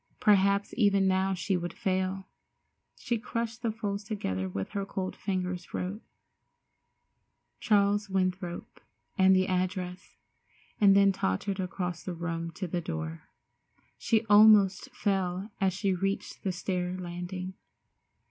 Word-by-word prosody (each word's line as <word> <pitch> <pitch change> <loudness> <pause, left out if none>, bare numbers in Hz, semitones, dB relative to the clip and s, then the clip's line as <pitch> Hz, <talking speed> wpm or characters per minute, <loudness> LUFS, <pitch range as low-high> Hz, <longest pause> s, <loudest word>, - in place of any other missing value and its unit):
Perhaps 200 -1 +3
even 200 -4 +4
now 190 0 +2
she 185 +2 -1
would 175 -1 -3
fail. 190 -3 -1 0.7
She 235 -2 -2
crushed 235 0 -4
the 230 -2 0
folds 205 -2 -4
together 95 - -3
with 95 +1 -4
her 200 - -3
cold 190 -1 -4
fingers, 180 -2 -3
wrote 195 +5 -3 1.6
"Charles 205 -2 +2
Winthrop" 185 -2 -2 0.3
and 190 -1 +5
the 185 0 +3
address, 185 0 -3 0.6
and 200 -2 +6
then 200 0 +6
tottered 190 - -2
across 180 -2 -3
the 180 - -5
room 165 0 -3
to 185 - -4
the 175 +1 -2
door. 80 - -5 0.7
She 220 0 +1
almost 205 -2 +6
fell 195 0 -1
as 190 -1 +3
she 195 +1 0
reached 195 +2 -3
the 190 - 0
stair 180 0 -2
landing. 180 +1 -5
190 Hz, 130 wpm, -29 LUFS, 180-200 Hz, 1.6 s, and